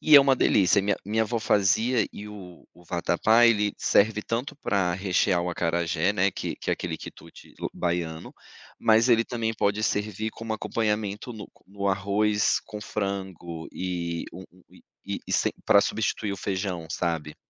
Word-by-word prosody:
E 155 - +5
é 140 - +11
uma 135 -1 +4
delícia, 100 -2 +4
minha 100 +1 0
minha 110 +3 +1
avó 115 +2 -2
fazia 110 +3 +2
e 105 - -8
o 95 -4 -11
o 90 - -19
vatapá, 110 +7 +3
ele 105 -3 +3
serve 105 +1 +2
tanto 120 +5 -3
pra 95 -9 0
rechear 95 -1 +1
o 90 - -2
acarajé, 85 +2 0
né, 95 -1 +2
que - - -4
que - - -4
é - - +3
aquele - - -3
quitute - - -12 0.2
baiano, 85 -2 -3 0.5
mas 115 +2 +4
ele 115 -1 +4
também 115 -2 -2
pode 105 0 0
servir 105 0 -1
como 115 0 -6
acompanhamento 105 0 -2
no 110 - -9 0.2
no 100 0 -3
arroz 100 +2 +1
com 105 -1 -7
frango, 95 -6 -4
e 85 -2 -3
um 95 - -9
um 90 +1 -22
um - - -20 0.3
e - - -3
e - - -3
sem - - +2
pra 100 - +7
substituir 105 -2 -1
o - - -4
feijão, 95 -3 -3
sabe? 80 -4 -2
100 Hz, 170 wpm, -26 LUFS, 90-110 Hz, 0.5 s, é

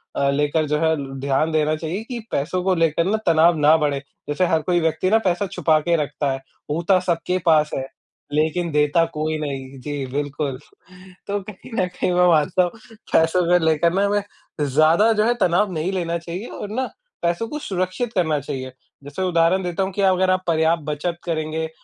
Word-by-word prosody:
अ, 140 - +1
लेकर 150 +2 +1
जो 150 +1 +1
है 160 0 +2 0.2
ध्यान 140 +4 0
देना 155 0 +1
चाहिए 165 +6 -4
कि 245 -2 -5
पैसों 180 +6 -1
को 190 0 +2
लेकर 165 -1 +2
ना 205 +4 +1
तनाव 165 +1 +5
ना 150 +1 +5
बढ़े। 145 -3 0 0.3
जैसे 150 +5 +1
हर 160 -1 +2
कोई 175 +3 +1
व्यक्ति 160 +2 0
ना 220 - +5
पैसा 195 -1 0
छुपा 160 -4 +2
के 170 +3 +1
रखता 145 0 -2
है, 135 - -2 0.3
होता 170 +5 +2
सबके 180 0 -1
पास 155 -2 +4
है 135 - -3 0.5
लेकिन 160 +3 0
देता 150 +2 +3
कोई 155 +1 -2
नहीं, 135 -2 -5
जी 145 +1 -4
बिल्कुल। 145 -1 -3 0.7
तो 205 0 -1
कहीं 210 +4 -12
ना 185 - +2
कहीं 180 0 -2
मैं 180 0 +4
मानता 165 +2 +3
हूँ, 175 - -1 0.4
पैसों 165 +3 +4
को 180 +1 +5
लेकर 160 +1 +2
ना 195 +2 +2
हमें 205 0 +1 0.4
ज़्यादा 155 - +4
जो 210 0 +2
है 240 - +3
तनाव 185 +3 +2
नहीं 165 +3 -1
लेना 170 -2 -1
चाहिए 170 +6 -6
और 205 - -7
ना, 255 +5 -2 0.3
पैसों 170 +6 0
को 300 - -4
सुरक्षित 190 +2 -3
करना 160 -7 +1
चाहिए। 130 -2 -6 0.3
जैसे 145 +6 -7
उदाहरण 180 +1 +2
देता 180 +1 -1
हूँ 190 - -3
कि 200 - -2
अगर 190 -1 +3
आप 185 0 0
पर्याप्त 160 0 +2
बचत 155 +3 -3
करेंगे 160 -1 -2
165 Hz, 195 wpm, -22 LUFS, 150-185 Hz, 0.7 s, तनाव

